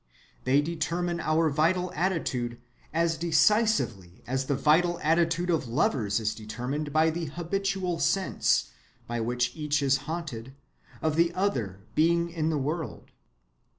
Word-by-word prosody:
They 135 +3 +4
determine 170 +2 -2
our 155 0 +2
vital 175 +5 +1
attitude 135 -9 -1 0.3
as 165 0 +1
decisively 160 - +2
as 130 +2 -2
the 140 - +1
vital 165 +5 +3
attitude 165 +2 +2
of 160 -6 0
lovers 115 -4 +1
is 110 -1 -1
determined 125 +7 -4
by 160 +2 +3
the 170 +1 -3
habitual 180 +2 -2
sense, 195 -1 +1 0.3
by 120 0 -3
which 125 +2 -1
each 150 -2 0
is 135 -1 +3
haunted, 135 -7 -5 0.5
of 155 -1 +1
the 170 0 +4
other 120 - -1
being 170 +2 +2
in 160 -2 -1
the 155 - 0
world. 150 +3 -4
155 Hz, 135 wpm, -28 LUFS, 130-170 Hz, 0.5 s, They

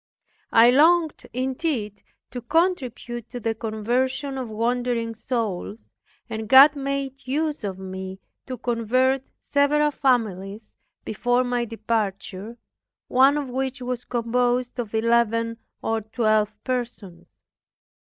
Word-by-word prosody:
I 230 +2 +7
longed 320 +3 +3
indeed 255 - -2 0.3
to 245 - -5
contribute 250 - -1
to 245 - -6
the 225 -1 -1
conversion 245 +6 -2
of 250 -3 -5
wandering 230 +1 -1
souls, 220 -4 -3 0.5
and 220 -2 -5
God 275 +3 +9
made 275 -1 -4
use 300 0 -1
of 195 -2 -3
me 190 0 -7 0.3
to 255 -1 -5
convert 250 +3 +1 0.2
several 295 +1 +2
families 215 -6 -1 0.3
before 245 +3 +1
my 245 -1 -1
departure, 215 -1 -3 0.5
one 270 +3 +5
of 290 -2 -3
which 265 +1 -3
was 250 -1 -4
composed 245 +1 0
of 225 -2 -4
eleven 230 0 +2 0.3
or 225 0 0
twelve 215 -1 +1
persons. 235 -8 -4
240 Hz, 115 wpm, -24 LUFS, 220-260 Hz, 0.5 s, God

